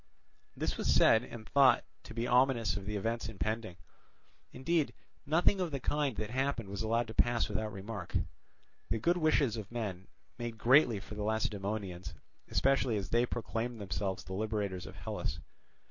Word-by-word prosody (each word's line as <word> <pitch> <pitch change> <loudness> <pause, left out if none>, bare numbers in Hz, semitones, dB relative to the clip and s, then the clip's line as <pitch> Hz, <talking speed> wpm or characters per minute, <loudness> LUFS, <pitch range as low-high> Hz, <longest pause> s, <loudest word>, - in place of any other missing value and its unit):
This - - -1
was - - +1
said 110 +1 +6
and 115 -3 -9
thought 140 -2 +5 0.2
to 115 - -9
be 115 0 -1
ominous 125 -5 +3
of 95 0 -6
the 105 - -2
events 115 +2 -2
impending; 110 -2 -3 0.7
indeed, 150 +4 0 0.3
nothing 175 +5 +3
of 180 - 0
the 140 -3 -3
kind 145 -1 0
that 105 +1 -3
happened 130 -4 -1
was 100 0 -4
allowed 115 +2 +1
to - - -6
pass 120 +1 +2
without 110 -1 -2
remark. 100 -1 -4 0.7
The - - +1
good 170 +11 +2
wishes 150 -8 +2
of 110 -1 -7
men 100 -6 -4 0.3
made 120 -1 -4
greatly 120 -2 +5
for 100 - -10
the 105 - -5
Lacedaemonians, 100 -5 -2 0.3
especially 135 -4 +2
as 100 -2 -4
they 120 +1 +3
proclaimed 115 0 -3
themselves 95 -1 -3
the 95 - -7
liberators 105 -2 -2
of - - -10
Hellas. - - -4
115 Hz, 165 wpm, -33 LUFS, 100-125 Hz, 0.7 s, said